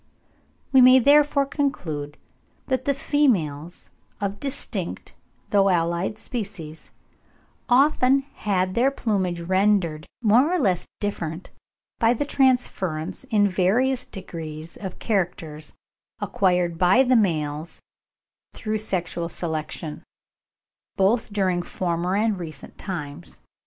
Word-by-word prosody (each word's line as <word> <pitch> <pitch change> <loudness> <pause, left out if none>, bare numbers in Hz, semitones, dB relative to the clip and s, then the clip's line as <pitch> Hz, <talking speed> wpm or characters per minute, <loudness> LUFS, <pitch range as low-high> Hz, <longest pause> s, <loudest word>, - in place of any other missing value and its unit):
We 265 - +7
may 255 +1 +8
therefore 285 +2 +4
conclude 160 - -3 0.5
that 260 -1 -1
the 280 - +2
females 175 - 0 0.3
of 200 0 -3
distinct 280 0 -3 0.4
though 195 -1 +4
allied 170 +3 0
species 200 -10 -6 0.8
have 245 - +6 0.2
often 265 +2 +3
had 185 -2 -1
their 250 +5 +3
plumage 190 -10 -1
rendered 185 -3 +1 0.2
more 240 +9 +4
or 365 - +2
less 190 - 0
different 175 -4 -4 0.5
by 230 +1 +3
the 290 - -1
transference 190 - 0
in 205 -2 +3
various 240 +8 +1
degrees 165 -3 -7
of 190 -3 -7
characters 170 -7 -3 0.5
acquired 180 -3 0
by 190 +9 +5
the 255 0 +3
males 160 -6 0 0.8
through 215 0 -2
sexual 175 -4 -2
selection, 155 -2 -5 0.9
both 215 +4 +1
during 190 -3 +1
former 175 +1 -2
and 210 -1 +1
recent 155 -5 -8
times. 165 -3 -7
190 Hz, 110 wpm, -24 LUFS, 170-240 Hz, 0.9 s, may